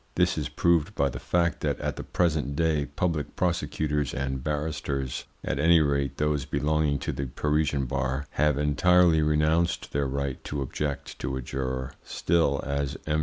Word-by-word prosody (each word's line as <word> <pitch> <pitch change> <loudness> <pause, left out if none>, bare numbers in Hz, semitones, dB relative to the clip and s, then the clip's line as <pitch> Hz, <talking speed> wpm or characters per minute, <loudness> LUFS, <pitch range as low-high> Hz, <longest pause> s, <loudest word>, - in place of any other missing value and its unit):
This 90 0 +3
is 75 -2 -2
proved 85 +4 +2
by 70 0 +2
the - - -6
fact 85 -1 0
that - - -1
at - - -2
the - - -5
present 80 -5 0
day 75 -2 +1
public 75 +1 -2
prosecutors 75 -5 -1
and 65 -1 -2
barristers, 75 -3 -2 0.2
at - - -2
any 85 +3 +6
rate 70 -3 0
those 75 -2 +1
belonging 75 -1 +1
to - - -3
the 70 - -3
Parisian 75 +1 0
bar, 65 +2 -1
have 75 -1 +2
entirely 85 +3 +4
renounced 75 +3 +1
their 70 -1 0
right 70 0 -3
to 70 -1 -2
object 70 +2 -4
to 65 +1 -2
a - - -4
juror; 65 0 -3
still, 80 -5 +1
as 70 0 -2
M. 75 0 +1
75 Hz, 170 wpm, -27 LUFS, 70-80 Hz, 0.2 s, any